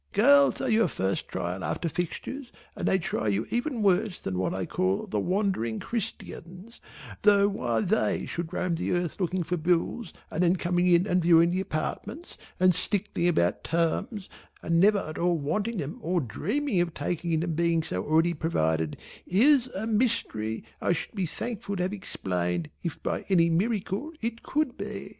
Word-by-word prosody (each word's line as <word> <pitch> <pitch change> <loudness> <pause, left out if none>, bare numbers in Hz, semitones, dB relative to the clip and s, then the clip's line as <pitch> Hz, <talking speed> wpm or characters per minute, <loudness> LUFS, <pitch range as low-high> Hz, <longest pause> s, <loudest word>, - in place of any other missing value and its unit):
Girls 280 +7 +5
are - - -1
your 225 -2 +4
first 95 - -2
trial 90 +1 -4
after 170 - -2
fixtures 205 - -4 0.2
and - - -2
they 190 - +4
try 165 -10 -2
you 105 +2 +1
even 240 -1 -1
worse 195 0 +2
than 95 - -4
what 95 - 0
I 95 -1 -2
call 95 +1 0
the 105 - -2
Wandering 180 - 0
Christians, 195 -2 -6 0.4
though 200 -1 +5
why 120 - -1
they 220 - +1
should 170 -1 -4
roam 180 -1 -1
the 165 - -1
earth 175 0 -1
looking 180 -1 0
for 175 +2 -2
bills 175 +5 0 0.2
and 165 - -1
then 180 0 +4
coming 175 0 +1
in 175 +1 +5
and 180 -3 +2
viewing 170 0 +5
the 185 +1 0
apartments 205 - -4 0.2
and 185 0 +5
stickling 185 0 0
about 90 - +1
terms 170 +5 -1 0.4
and 165 0 +2
never 205 +3 +5
at 155 -5 -4
all 175 0 +2
wanting 205 +10 -1
them 150 -3 -4
or 175 +2 0
dreaming 185 - -1
of 170 -2 -2
taking 170 -2 -1
them 165 0 -1
being 165 0 +1
already 155 - +2
provided, 80 - 0 0.3
is, 255 - +4
a 195 +3 -2
mystery 210 - 0 0.2
I - - +2
should 165 0 -5
be 195 -5 -1
thankful 205 +2 -4
to 180 - -1
have 185 +2 -1
explained 90 - -3
if 170 -4 -5
by - - -2
any 170 -3 +4
miracle 210 - -1
it 230 0 -3
could 300 -4 -1
be. - - -5
175 Hz, 175 wpm, -27 LUFS, 160-205 Hz, 0.4 s, Girls